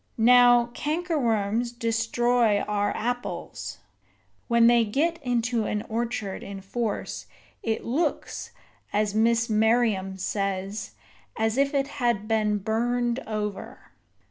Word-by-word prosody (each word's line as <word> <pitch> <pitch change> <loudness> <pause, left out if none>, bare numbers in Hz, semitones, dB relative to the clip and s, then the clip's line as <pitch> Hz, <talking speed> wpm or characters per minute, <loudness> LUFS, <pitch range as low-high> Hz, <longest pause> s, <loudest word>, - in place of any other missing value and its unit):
Now, 245 0 +6
cankerworms 240 - 0
destroy 230 -1 +2
our 205 -1 0
apples. 245 +2 -4 0.7
When 235 -1 +4
they 235 0 +6
get 315 +10 0
into 240 -3 0
an 210 0 -2
orchard 225 -3 -3
in 195 -1 -7
force, 215 +2 -4 0.3
it 225 -1 -2
looks, 300 +6 -2 0.4
as 210 0 0
Miss 230 +1 +3
Merriam 215 -4 +2
says, 195 +1 -3 0.4
as 220 0 +1
if 275 +1 +1
it 275 0 +1
had 235 -4 +1
been 215 -2 +1
burned 240 +4 0
over. 210 -2 -5
230 Hz, 110 wpm, -26 LUFS, 210-245 Hz, 0.7 s, Now